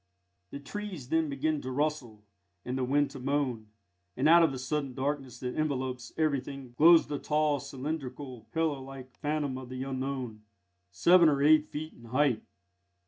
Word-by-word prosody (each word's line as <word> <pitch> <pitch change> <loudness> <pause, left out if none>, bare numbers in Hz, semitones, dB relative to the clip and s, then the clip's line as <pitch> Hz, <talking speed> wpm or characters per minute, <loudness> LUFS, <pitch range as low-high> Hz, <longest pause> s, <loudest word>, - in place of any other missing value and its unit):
The 140 - -7
trees 180 -2 -7
then 160 -1 +1
begin 145 +2 -1
to 130 - -5
rustle, 130 -6 -2 0.4
and 125 - -3
the 130 - -1
wind 145 +3 +2
to 135 - -8
moan, 130 -4 -1 0.5
and 135 +4 +2
out 170 +2 +8
of 165 -3 +4
the 135 - -5
sudden 135 0 -3
darkness 135 -1 -3
that 125 -1 -3
envelops 130 -5 -2
everything 140 -4 -2
glows 165 +4 +7
the 145 -1 -4
tall, 150 -1 +1
cylindrical, 140 -2 -6
pillar 160 -4 0
like 130 -1 -10
phantom 145 -3 -1
of 130 -1 -10
the 130 0 -4
Unknown, 130 -4 -4 0.5
seven 170 - +5
or 140 -1 +1
eight 155 0 +5
feet 155 +2 -6
in 120 - -16
height. 130 0 +1
140 Hz, 165 wpm, -30 LUFS, 130-150 Hz, 0.5 s, out